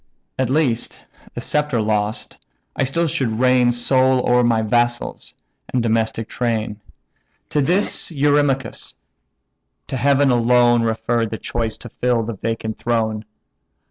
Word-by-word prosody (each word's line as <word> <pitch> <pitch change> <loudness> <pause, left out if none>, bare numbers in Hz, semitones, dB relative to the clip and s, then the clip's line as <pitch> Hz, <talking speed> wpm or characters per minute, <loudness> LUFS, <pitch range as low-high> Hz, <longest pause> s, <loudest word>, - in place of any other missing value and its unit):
At 130 -2 +1
least, 135 -5 -1 0.3
the - - -4
sceptre 150 -5 0
lost, 105 0 -2 0.4
I 135 - +1
still 165 +6 0
should 135 -6 -1
reign 125 -1 +4
Sole 130 +1 +2
o'er 125 0 +4
my 115 -2 +2
vassals, 120 +2 -1 0.4
and 125 -2 0
domestic 115 -1 0
train." 110 -3 -2 0.7
To 150 - +1
this 180 +8 +2
Eurymachus: 145 -3 0 0.9
"To 130 - -2
Heaven 140 +1 +3
alone 120 0 +4
Refer 115 +1 0
the 110 - -5
choice 115 -1 -3
to 120 - -10
fill 120 0 0
the 115 +1 -4
vacant 110 +1 -4
throne. 110 -3 -1
120 Hz, 130 wpm, -20 LUFS, 115-130 Hz, 0.9 s, reign